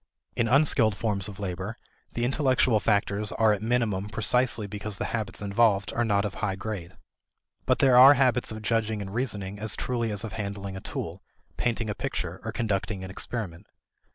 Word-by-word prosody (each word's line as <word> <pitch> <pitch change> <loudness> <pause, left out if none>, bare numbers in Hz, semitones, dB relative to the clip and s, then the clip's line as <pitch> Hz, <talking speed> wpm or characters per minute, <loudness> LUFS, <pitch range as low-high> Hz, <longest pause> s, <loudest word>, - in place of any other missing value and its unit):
In 115 - +1
unskilled 125 -4 +4
forms 105 -4 -1
of 100 -3 -9
labor, 95 +3 -4 0.4
the 120 - -1
intellectual 130 -4 +2
factors 100 0 0
are 110 -1 +4
at 105 - -3
minimum 110 -4 0
precisely 115 +1 +1
because 105 0 -4
the - - -2
habits 105 -3 -3
involved 100 -1 +2
are 120 - +1
not 100 -2 +1
of 100 - -3
a - - -11
high 100 -3 -1
grade. 100 -4 -6 0.7
But - - +3
there 130 -2 +4
are 135 +3 +10
habits 125 -4 +2
of 110 0 -7
judging 110 -2 0
and 95 0 -8
reasoning 105 -5 -3
as 110 +1 -3
truly 120 -2 -2
as 105 +1 -2
of 110 -3 -6
handling 100 -1 -5
a 95 - -6
tool, - - -5 0.3
painting 115 -1 -1
a 105 - -1
picture, - - -4
or - - -3
conducting 105 -3 -2
an 95 - -7
experiment. 100 -3 -5
105 Hz, 185 wpm, -27 LUFS, 100-115 Hz, 0.7 s, are